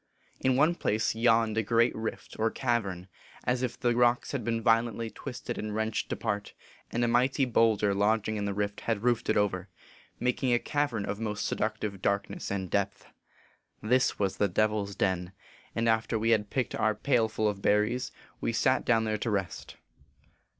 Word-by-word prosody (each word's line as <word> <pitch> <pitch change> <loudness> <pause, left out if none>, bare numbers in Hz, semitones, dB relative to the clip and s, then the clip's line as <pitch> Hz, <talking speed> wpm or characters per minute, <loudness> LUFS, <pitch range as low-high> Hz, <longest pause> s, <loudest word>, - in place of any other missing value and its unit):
In 130 -1 +2
one 155 +6 +4
place 110 -10 0
yawned 115 -1 +3
a - - +3
great 115 +3 +2
rift, 110 0 -5
or 110 +1 +2
cavern, 105 -8 -2 0.4
as 125 0 0
if 125 -1 -3
the 120 -2 +1
rocks 120 0 +2
had 140 -4 -3
been 115 -1 0
violently 115 0 +1
twisted 130 -4 -6
and 105 -1 -4
wrenched 110 0 -2
apart, 105 -2 -3 0.3
and 120 - -1
a - - +3
mighty 130 +3 +2
bowlder 110 -4 +3
lodging 110 +2 +1
in 105 -1 -2
the 100 - -1
rift 105 0 -2
had 115 -2 -1
roofed 120 -2 +1
it - - +3
over, 95 -2 0 0.5
making 125 +1 0
a - - +5
cavern 125 -6 -1
of 105 - -4
most 105 -2 -2
seductive 105 -2 -2
darkness 100 +1 -1
and 95 -3 -3
depth. 100 0 -1 0.7
This 125 +4 +2
was 100 -2 -1
the 105 - +3
Devil 105 +2 +1
s 100 - -9
Den; 90 -1 -1 0.4
and 115 0 0
after 115 0 +1
we 115 +1 +1
had 105 -2 +2
picked 130 -4 -1
our 110 -1 +1
pail 115 0 +2
full 110 0 0
of 100 -2 -2
berries, 105 +6 +1 0.3
we - - -1
sat 115 +3 +2
down 115 -2 +3
there 110 -1 -1
to 115 - -2
rest. 100 -4 -3
110 Hz, 185 wpm, -29 LUFS, 105-120 Hz, 0.7 s, a